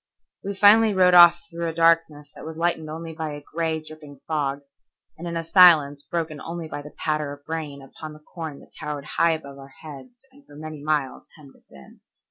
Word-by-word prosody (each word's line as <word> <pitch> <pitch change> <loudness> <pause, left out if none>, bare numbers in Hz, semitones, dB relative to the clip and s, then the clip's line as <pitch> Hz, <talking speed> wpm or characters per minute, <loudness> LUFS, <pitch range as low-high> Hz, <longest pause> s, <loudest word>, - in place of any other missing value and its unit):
We 200 +1 -5
finally 210 +2 +5
rode 180 -1 +4
off 175 -1 +7
through 170 0 -5
a - - -5
darkness 165 -3 +2
that - - -12
was 160 0 -8
lightened 165 -2 -1
only 160 +1 -7
by 160 -1 -5
a 145 - -11
gray, 160 -1 -1
dripping 150 -3 -13
fog, 145 -3 -2 0.5
and 175 - -8
in 170 0 -4
a 165 - -3
silence 160 -5 +5
broken 160 -1 -4
only 165 -1 -6
by 145 - -6
the 150 +1 -13
patter 150 -2 -2
of 145 0 -16
rain 150 -4 -5
upon 155 +3 -10
the 150 - -14
corn 160 -5 -7
that - - -20
towered 150 -2 -6
high 165 +2 +1
above 140 -3 -8
our 135 - -11 0.2
heads 155 - -11 0.2
and 280 +2 -21
for 145 - -16
many 155 0 -9
miles 150 -3 -2
hemmed 145 -4 -17
us - - -28
in. 70 -1 -16
155 Hz, 210 wpm, -23 LUFS, 145-170 Hz, 0.5 s, off